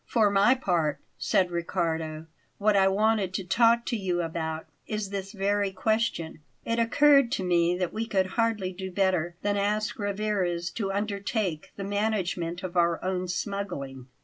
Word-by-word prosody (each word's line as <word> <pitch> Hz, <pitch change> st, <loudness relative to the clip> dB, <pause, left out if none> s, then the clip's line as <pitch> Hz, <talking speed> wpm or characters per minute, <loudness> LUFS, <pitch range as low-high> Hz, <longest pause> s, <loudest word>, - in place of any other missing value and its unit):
"For 215 Hz, -4 st, +3 dB
my 205 Hz, +6 st, +5 dB
part," 170 Hz, -, 0 dB, 0.2 s
said 185 Hz, -2 st, +2 dB
Riccardo; 165 Hz, -2 st, -2 dB, 0.3 s
"what 210 Hz, 0 st, +2 dB
I 195 Hz, -1 st, +5 dB
wanted 200 Hz, -1 st, +1 dB
to 195 Hz, -, -2 dB
talk 230 Hz, +5 st, +3 dB
to -, -, -1 dB
you 180 Hz, -4 st, -1 dB
about 160 Hz, -1 st, -3 dB, 0.2 s
is 210 Hz, -2 st, -3 dB
this 195 Hz, -1 st, -4 dB
very 200 Hz, -1 st, 0 dB
question. 205 Hz, -5 st, -1 dB, 0.3 s
It 230 Hz, 0 st, 0 dB
occurred 275 Hz, +2 st, +5 dB
to 190 Hz, -, -1 dB
me 175 Hz, -1 st, +2 dB
that 180 Hz, -2 st, -2 dB
we 225 Hz, +1 st, -2 dB
could 190 Hz, -4 st, +2 dB
hardly 220 Hz, -5 st, 0 dB
do 190 Hz, +1 st, -6 dB
better 180 Hz, -3 st, +1 dB
than 205 Hz, 0 st, +1 dB
ask 215 Hz, +3 st, -1 dB
Rivarez 195 Hz, -4 st, -1 dB
to 195 Hz, -2 st, -2 dB
undertake 200 Hz, -4 st, -2 dB
the 200 Hz, -, -5 dB
management 195 Hz, -4 st, -1 dB
of 185 Hz, -1 st, -5 dB
our 170 Hz, -1 st, +3 dB
own 185 Hz, 0 st, -1 dB
smuggling. 175 Hz, -9 st, -4 dB
195 Hz, 160 wpm, -27 LUFS, 175-215 Hz, 0.3 s, my